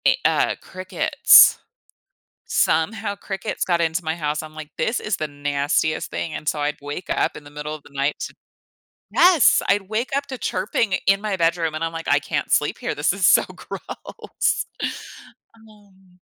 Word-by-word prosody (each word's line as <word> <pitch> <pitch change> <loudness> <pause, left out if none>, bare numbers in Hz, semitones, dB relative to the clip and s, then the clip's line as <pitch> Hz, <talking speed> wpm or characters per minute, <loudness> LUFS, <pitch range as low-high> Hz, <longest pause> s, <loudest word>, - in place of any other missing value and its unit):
E - - +5
uh, - - +2
crickets. 185 0 +5 0.9
Somehow 205 +6 0
crickets 195 -1 -4
got 170 -2 +1
into 165 +2 0
my 160 +1 -1
house, 150 -2 -2
I'm 155 0 -11
like, 155 -1 -8
"This 235 - 0
is 210 -4 -2
the 155 - -2
nastiest 145 +1 -1
thing," 160 - -4
and, 150 - -7
so, 150 - 0
I'd 150 +1 -1
wake 145 +5 -7
up - - 0
in 150 - -10
the 145 - -13
middle 150 +1 -5
of 150 - -13
the 145 - -16
night 140 +1 -1
to - - -5 0.8
Yes! 350 -7 +5
I'd 200 0 +2
wake 225 +4 -2
up 280 0 -1
to 265 -1 -6
chirping 200 0 -1
in 195 +1 +4
my 210 -2 -1
bedroom, 165 -1 +1
and 155 +1 -4
I'm 165 - -1
like, 165 0 -7
"I - - +4
can't - - -3
sleep - - +2
here. - - -3
This - - +1
is - - 0
so - - +6
gross." - - -4 0.9
Um 200 -4 -22
170 Hz, 180 wpm, -22 LUFS, 150-200 Hz, 0.9 s, so